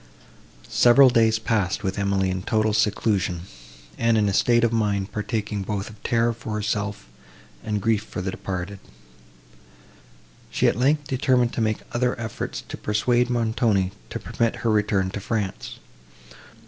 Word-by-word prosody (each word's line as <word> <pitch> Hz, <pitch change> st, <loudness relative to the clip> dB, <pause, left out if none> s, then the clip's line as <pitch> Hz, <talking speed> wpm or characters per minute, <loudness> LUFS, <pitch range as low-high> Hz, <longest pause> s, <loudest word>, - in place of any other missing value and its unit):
Several 125 Hz, +2 st, +6 dB
days 115 Hz, -2 st, +3 dB
passed 110 Hz, -3 st, -1 dB
with 95 Hz, +1 st, -2 dB
Emily 100 Hz, -1 st, +1 dB
in 95 Hz, 0 st, -3 dB
total 110 Hz, +2 st, +1 dB
seclusion, 100 Hz, -4 st, +1 dB, 0.6 s
and 115 Hz, -1 st, +3 dB
in 105 Hz, -1 st, +3 dB
a 100 Hz, -, 0 dB
state 120 Hz, +3 st, +3 dB
of 115 Hz, -1 st, +2 dB
mind 105 Hz, -3 st, 0 dB
partaking 105 Hz, -1 st, -3 dB
both 100 Hz, +2 st, -4 dB
of 105 Hz, -, -17 dB
terror 115 Hz, 0 st, +1 dB
for 115 Hz, -1 st, -7 dB
herself, 105 Hz, -1 st, -2 dB, 0.6 s
and 105 Hz, -1 st, -1 dB
grief 110 Hz, -2 st, +2 dB
for 110 Hz, -, -7 dB
the 95 Hz, +1 st, -2 dB
departed. 95 Hz, +1 st, -5 dB, 1.7 s
She, -, -, +1 dB
at -, -, +2 dB
length, 145 Hz, +5 st, +2 dB
determined 130 Hz, -2 st, +2 dB
to -, -, -2 dB
make 110 Hz, -1 st, 0 dB
other 125 Hz, 0 st, 0 dB
efforts 110 Hz, -2 st, -4 dB
to -, -, -7 dB
persuade 120 Hz, +4 st, +1 dB
Montoni 110 Hz, -5 st, +1 dB, 0.2 s
to -, -, -5 dB
permit 115 Hz, -1 st, -1 dB
her 115 Hz, -, +3 dB
return 100 Hz, -3 st, +1 dB
to 105 Hz, -, -4 dB
France. 100 Hz, -1 st, -3 dB
110 Hz, 150 wpm, -24 LUFS, 100-115 Hz, 1.7 s, Several